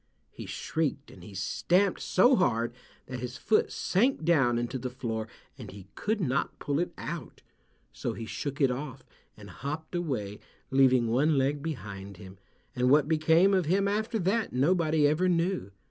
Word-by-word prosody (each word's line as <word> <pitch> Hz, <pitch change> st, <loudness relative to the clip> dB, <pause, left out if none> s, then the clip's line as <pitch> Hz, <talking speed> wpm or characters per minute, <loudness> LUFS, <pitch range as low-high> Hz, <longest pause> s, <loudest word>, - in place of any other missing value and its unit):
he -, -, -9 dB
shrieked 150 Hz, -3 st, -3 dB
and 90 Hz, -, -14 dB
he 100 Hz, +2 st, -11 dB
stamped 180 Hz, -, +1 dB
so 245 Hz, +8 st, +4 dB
hard 120 Hz, -, +1 dB, 0.3 s
that 130 Hz, -1 st, -6 dB
his 125 Hz, +1 st, -6 dB
foot 220 Hz, -, +1 dB
sank 215 Hz, -, +1 dB
down 135 Hz, -8 st, +3 dB
into 120 Hz, +2 st, -3 dB
the 125 Hz, +1 st, -4 dB
floor 115 Hz, -3 st, -4 dB, 0.3 s
and -, -, -8 dB
he 100 Hz, -1 st, -11 dB
could 215 Hz, +1 st, -1 dB
not 140 Hz, -6 st, -1 dB
pull 145 Hz, +1 st, -1 dB
it 175 Hz, -, -1 dB
out, -, -, -7 dB, 0.5 s
so -, -, -3 dB
he 115 Hz, -, -6 dB
shook 140 Hz, +5 st, -5 dB
it 135 Hz, -3 st, +3 dB
off 130 Hz, 0 st, -6 dB, 0.3 s
and 100 Hz, -3 st, -11 dB
hopped 150 Hz, +5 st, -5 dB
away, 125 Hz, -, -3 dB, 0.3 s
leaving 130 Hz, -2 st, +4 dB
one 140 Hz, +6 st, +2 dB
leg 140 Hz, +2 st, +1 dB
behind 100 Hz, -, -6 dB
him, 95 Hz, -1 st, -12 dB, 0.4 s
and 125 Hz, 0 st, +2 dB
what 145 Hz, +1 st, +5 dB
became 160 Hz, +5 st, +4 dB
of 185 Hz, -3 st, +2 dB
him 195 Hz, +5 st, +2 dB
after 215 Hz, +3 st, -1 dB
that 210 Hz, +3 st, 0 dB
nobody 155 Hz, +2 st, +2 dB
ever 155 Hz, +5 st, +2 dB
knew. 175 Hz, -, 0 dB
145 Hz, 170 wpm, -29 LUFS, 120-175 Hz, 0.5 s, what